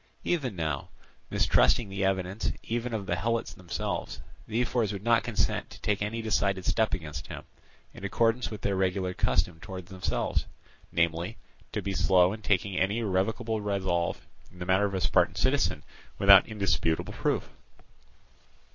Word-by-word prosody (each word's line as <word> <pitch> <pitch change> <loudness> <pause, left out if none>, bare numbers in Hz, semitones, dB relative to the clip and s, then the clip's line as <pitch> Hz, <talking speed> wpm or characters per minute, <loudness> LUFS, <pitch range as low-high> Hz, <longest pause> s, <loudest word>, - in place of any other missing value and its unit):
Even 135 - -1
now, 80 -4 -2 0.4
mistrusting 115 - +3
the 95 0 -3
evidence 95 +1 0
even 120 +2 -2
of 110 -3 -3
the 85 - 0
Helots 115 +5 -1
themselves, 90 -1 -4 0.3
the 110 +1 -1
ephors 120 -3 +1
would 100 -1 -6
not 115 0 +4
consent 120 -3 -1
to - - -12
take 105 -1 0
any 110 +2 -2
decided 100 -4 0
step 110 -1 +2
against 75 -6 -7
him; - - -7 0.5
in - - -12
accordance 115 +5 +1
with 110 - -7
their 100 -1 0
regular 95 0 0
custom 85 -2 +1
towards 95 +1 -8
themselves, 95 -1 -1 0.4
namely, 85 +5 0 0.3
to - - -3
be 100 - -2
slow 90 -1 +4
in 110 - -8
taking 100 -2 +1
any 100 +4 +1
irrevocable 110 +2 0
resolve 95 -4 -1 0.3
in 90 - -17
the 90 - -5
matter 95 +3 +3
of 100 -1 -2
a 95 - -1
Spartan - - +3
citizen - - +1 0.3
without 100 -1 +8
indisputable 85 -7 0
proof. - - -1
100 Hz, 155 wpm, -28 LUFS, 90-110 Hz, 0.5 s, without